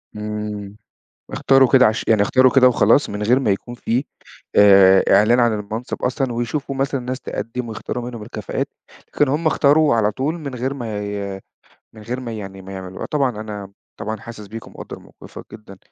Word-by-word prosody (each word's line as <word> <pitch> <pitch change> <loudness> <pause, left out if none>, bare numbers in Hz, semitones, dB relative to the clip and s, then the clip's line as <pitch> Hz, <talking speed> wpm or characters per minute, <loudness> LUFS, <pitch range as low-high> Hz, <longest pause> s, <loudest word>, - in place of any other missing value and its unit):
إمم. 105 -1 -5 0.5
اختاروا 135 -2 +4
كده 130 -1 +7
عش 110 +1 0
يعني 110 -2 +4
اختاروا 130 +4 +4
كده 130 -2 +6
وخلاص 115 +3 +3
من 105 +1 -4
غير 120 +5 +3
ما 110 - +1
يكون 120 +5 -3
في 120 +2 -1 0.5
آآ 95 -2 +7
إعلان 120 +4 +4
عن 120 -2 +3
المنصب 110 +4 -6
أصلًا، 130 0 -1
ويشوفوا 120 +4 -3
مثلًا 135 0 -1
ناس 125 +1 -5
تقدم 115 +3 -5
ويختاروا 120 +2 -5
منهم 120 -2 -7
الكفاءات، 105 -2 -4 0.5
لكن 145 - +2
هُم 155 +4 -1
اختاروا 150 -1 +4
على 105 -2 +2
طول 150 +8 -2
من 140 -5 -6
غير 130 +3 -2
ما 115 -5 -5
ي 100 -1 -5 0.5
من 110 - -13
غير 120 +4 -4
ما 120 -3 -6
يعني 95 -3 -7
ما 95 +1 -10
يعملوها، 95 -1 -7
طبعًا 140 -3 0
أنا 105 -2 -7 0.3
طبعًا 110 +1 -4
حاسس 105 -1 -10
بيك 115 +3 -9
ومقدّر - - -10
موقفك - - -13
جدًا. 105 -3 -12
115 Hz, 180 wpm, -20 LUFS, 105-130 Hz, 0.5 s, كده